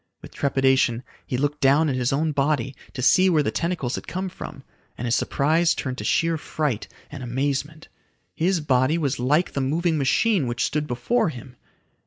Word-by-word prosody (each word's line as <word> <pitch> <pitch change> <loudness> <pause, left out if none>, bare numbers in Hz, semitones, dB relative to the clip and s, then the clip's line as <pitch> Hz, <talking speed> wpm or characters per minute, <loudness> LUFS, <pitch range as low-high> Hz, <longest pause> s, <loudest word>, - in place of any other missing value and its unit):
With - - -10
trepidation 130 -3 +2 0.2
he 125 - -2
looked 145 +2 -1
down 145 +3 +4
at 135 - 0
his 125 -1 0
own 155 +3 +1
body 140 -2 0 0.2
to 125 - -4
see 185 +8 +5
where 155 -4 +3
the - - -1
tentacles 165 -8 -2
had - - -5
come 185 +2 -3
from, 140 -5 -9 0.3
and 120 - -4
his 120 0 +2
surprise 160 +7 +2
turned 130 -1 -4
to - - -4
sheer 165 -1 +1
fright 150 -8 -2 0.2
and 145 -2 -8
amazement. 140 +5 -3 0.5
His 175 +1 +1
body 135 +2 +2
was 140 -6 -1
like 150 +8 +2
the 140 - -1
moving 160 +4 0
machine 155 - +2
which 120 0 -1
stood 150 0 -2
before 180 - 0
him! 125 -2 -10
145 Hz, 185 wpm, -24 LUFS, 130-160 Hz, 0.5 s, see